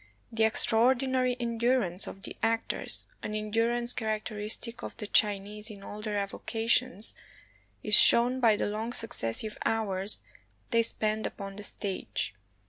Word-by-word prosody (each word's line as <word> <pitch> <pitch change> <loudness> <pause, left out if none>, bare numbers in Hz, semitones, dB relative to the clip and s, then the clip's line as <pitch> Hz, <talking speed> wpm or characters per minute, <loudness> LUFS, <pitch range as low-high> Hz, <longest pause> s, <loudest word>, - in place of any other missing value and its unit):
The 225 -1 +2
extraordinary 255 +3 +2
endurance 235 -5 -1
of 195 - -10
the - - -7
actors, 225 0 -1 0.2
an 215 - -5
endurance 230 +3 -1
characteristic 215 +1 -2
of - - -8
the 210 - -6
Chinese 210 +1 +1
in 200 -2 -11
all 210 +1 -9
their 210 -1 -3
avocations, 225 +2 0 0.7
is 210 - 0
shown 240 +4 +7
by 230 -4 +4
the - - -2
long 220 +3 -4
successive 215 - -1
hours 205 -2 -1 0.5
they 230 -1 +3
spend 215 -1 +2
upon 195 -1 -9
the 205 - -8
stage. 195 - -2
220 Hz, 130 wpm, -28 LUFS, 210-235 Hz, 0.7 s, shown